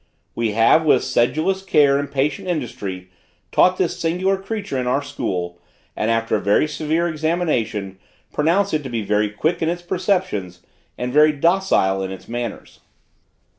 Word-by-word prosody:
We 115 -2 -1
have, 115 +9 +4
with 155 - +3
sedulous 155 +10 +1
care 145 -7 +3
and 140 -1 -4
patient 140 +4 -1
industry, 100 - -4 0.4
taught 185 0 +4
this 180 -3 -1
singular 180 +4 +1
creature 195 -7 -4
in 125 - -2
our 135 +3 +1
school, 90 -11 -4 0.4
and 110 - -1
after 115 0 +1
a - - -1
very 100 +9 +3
severe 155 +2 -1
examination, 150 - -1 0.3
pronounce 175 +6 +1
it 155 - +1
to 135 - -7
be 115 -3 -2
very 105 +1 +1
quick 155 +12 -1
in 160 - +1
its 175 +1 -3
perceptions 175 - -1 0.4
and 125 0 -3
very 150 +1 +6
docile 150 - +2
in 95 - -3
its 95 - -9
manners. 120 -2 -6
145 Hz, 160 wpm, -21 LUFS, 110-170 Hz, 0.4 s, very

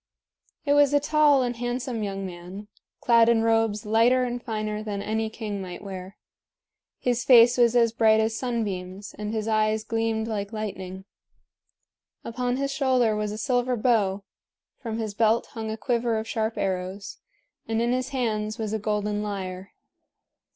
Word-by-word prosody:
It 285 - +3
was 290 0 +4
a - - +5
tall 295 -2 +4
and 245 -1 -2
handsome 245 0 -3
young 195 -1 -3
man, 180 +3 -9 0.3
clad 230 -1 +5
in 225 -1 +3
robes 225 -1 +1
lighter 230 +4 +4
and 245 -1 -3
finer 215 -2 -3
than 210 -2 -4
any 220 +2 -2
king 215 -3 -5
might 180 +1 -8
wear. 190 0 -8 0.8
His 245 -1 0
face 240 -1 +7
was 240 -1 +3
as 230 -2 +4
bright 220 -1 +4
as 220 0 0
sunbeams, 200 -6 -4
and 210 0 -3
his 220 -1 -2
eyes 215 0 +1
gleamed 225 -1 -1
like 205 -2 -3
lightning. 190 -3 -6 1.2
Upon 245 +2 -2
his 275 0 -1
shoulder 255 -5 +2
was 210 -1 -2
a 210 - -5
silver 245 +2 0
bow, 205 -4 +1 0.6
from 225 -4 -4
his 220 -2 -3
belt 225 +2 +2
hung 220 -2 -5
a 220 - -4
quiver 235 -1 0
of 220 +1 -4
sharp 220 -1 -2
arrows, 190 +1 -3 0.5
and 225 0 0
in 235 +1 +1
his 255 0 -1
hands 220 -5 -2
was 220 -2 -3
a 220 - -1
golden 210 0 -1
lyre. 190 -2 -5
220 Hz, 165 wpm, -25 LUFS, 210-240 Hz, 1.2 s, face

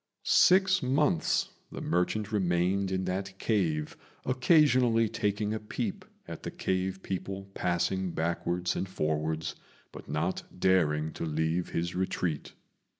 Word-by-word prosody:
Six 190 +1 +5
months 130 - +2 0.2
the - - -6
merchant 100 +4 0
remained 95 0 +1
in 95 0 -1
that 95 +1 -3
cave, 85 -9 0 0.3
occasionally 130 -4 +4
taking 105 +1 -1
a 110 - -2
peep 105 - -4 0.2
at - - -7
the - - -4
cave 95 0 -2
people 95 +1 -5
passing 90 +1 0
backwards 85 +2 -1
and 95 - -2
forwards, 80 -1 -1 0.4
but - - -11
not - - -1 0.2
daring 80 -5 +2
to - - -5
leave 80 +2 -1
his 85 +1 -2
retreat. 90 -4 -2
95 Hz, 125 wpm, -29 LUFS, 85-105 Hz, 0.4 s, Six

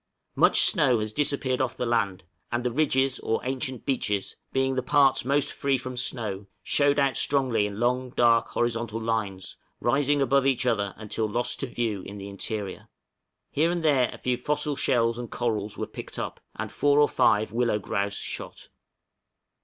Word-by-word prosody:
Much - - +5
snow 145 - +4
has 110 0 -3
disappeared 140 -2 0
off 130 - -2
the 125 - -1
land; 100 -6 0 0.3
and 120 0 -1
the 125 - 0
ridges 135 -1 +1
or 115 - -1
ancient 130 -1 -3
beaches, 105 -8 -1 0.2
being 135 0 +1
the 130 - 0
parts 135 +1 +3
most 140 +3 +1
free 140 -2 +1
from 130 0 -6
snow, 105 -6 -2 0.2
showed 145 0 +2
out 140 -3 +2
strongly 130 -7 +2
in 100 0 -7
long, 125 +2 0
dark, 115 -1 +4
horizontal 115 -1 -2
lines, 105 -5 -3 0.2
rising 145 +1 +2
above 135 0 +3
each 130 -2 +1
other 100 -5 0
until 110 0 -3
lost 120 +3 -1
to 135 - -2
view 115 -5 -2
in 100 +2 -9
the 100 0 -7
interior. 100 0 -5 0.6
Here 160 +4 +2
and 175 -2 -2
there 135 -5 +3
a - - -9
few 125 -1 -1
fossil 150 +3 -1
shells 115 -2 +2
and 120 -2 -6
corals 110 -4 -2
were - - -2
picked - - -9
up, - - -4 0.2
and - - -5
four 145 0 +3
or 145 - +6
five 110 -4 +2
willow 115 -2 +1
grouse 100 0 -2
shot. - - -6
125 Hz, 175 wpm, -26 LUFS, 110-135 Hz, 0.6 s, or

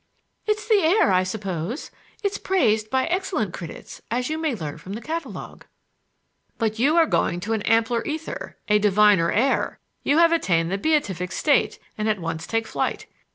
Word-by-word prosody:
"It's 425 0 0
the 435 -3 +5
air, 335 - +4
I 185 0 +4
suppose. 185 - -4 0.3
It's 400 0 -1
praised 220 - +1
by 260 +1 +1
excellent 340 - -1
critics, 170 -2 -9
as 250 +5 -1
you 315 - -2
may 315 -5 0
learn 155 -7 -6
from 190 - -8
the 220 - -4
catalogue." 325 +6 -6 0.9
"But 220 -1 -1
you 285 +6 +3
are 330 - +6
going 175 - 0
to 220 +4 -2
an 220 - -1
ampler 230 +1 +2
ether, 315 +1 -5
a 210 -1 +4
diviner 205 -4 +4
air. 265 +5 +1 0.2
You 290 - +2
have 335 0 +6
attained 170 - +1
the 195 - -1
beatific 195 - 0
state 285 - +2 0.2
and 215 +1 0
at 215 - +1
once 165 -1 -4
take 225 0 0
flight. - - -2
225 Hz, 175 wpm, -24 LUFS, 195-315 Hz, 0.9 s, are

